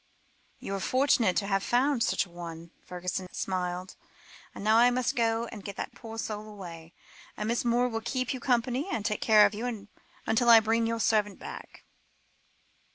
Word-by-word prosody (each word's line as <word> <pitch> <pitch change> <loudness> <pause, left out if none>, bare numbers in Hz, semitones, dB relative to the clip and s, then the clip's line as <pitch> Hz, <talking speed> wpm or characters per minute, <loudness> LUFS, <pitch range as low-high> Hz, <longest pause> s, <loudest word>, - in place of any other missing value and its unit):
"You 195 - -6
are 195 - -2
fortunate 255 -5 +2
to 200 - +1
have 195 -1 +1
found 250 +4 +1
such - - +1
an 175 - -19
one," 170 -1 -8
Fergusson 180 +1 -5
smiled, 180 0 -3 0.6
"and - - -7
now 215 +1 +4
I 240 +1 +6
must 245 0 0
go 230 -1 +1
and 210 -4 -9
get 200 0 -7
that - - -5
poor 225 -1 -9
soul 215 -1 -4
away; 170 -5 -10 0.4
and 210 - -3
Miss 235 +1 0
Moore 240 +1 +2
will 225 -2 -3
keep 255 +3 -2
you 260 - -5
company, 250 +4 0
and 210 - -2
take 210 -1 -1
care 215 -2 +6
of 205 - +1
you, 220 -1 -5 0.4
until 235 +2 +2
I 230 -1 +10
bring 225 +1 +1
your 230 0 -2
servant 210 -2 +1
back." - - -10
220 Hz, 185 wpm, -28 LUFS, 195-235 Hz, 0.6 s, I